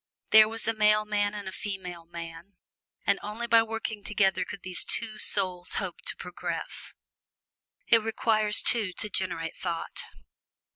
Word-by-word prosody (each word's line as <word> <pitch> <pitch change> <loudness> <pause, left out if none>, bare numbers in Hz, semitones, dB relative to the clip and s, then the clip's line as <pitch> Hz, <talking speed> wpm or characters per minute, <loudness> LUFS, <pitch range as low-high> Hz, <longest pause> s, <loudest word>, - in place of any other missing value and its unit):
There 215 0 +8
was 225 0 -1
the 225 - +2
male 215 0 +3
man 205 -1 0
and 205 -1 -6
the - - -4
female 180 -4 -6
man, 170 +2 -9 0.5
and - - +2
only 215 +3 -5
by 230 -1 +6
working 225 -2 -4
together 195 -2 +1
could 200 - -9
these 185 -1 +2
two 220 -2 -2
souls 185 -3 0
hope - - -4
to - - -1
progress. - - -5 0.9
It 230 -1 +5
requires 215 -1 +2
two 210 -6 +4
to 210 - -3
generate 180 -4 -2
thought. 170 -2 -3
205 Hz, 150 wpm, -28 LUFS, 185-220 Hz, 0.9 s, There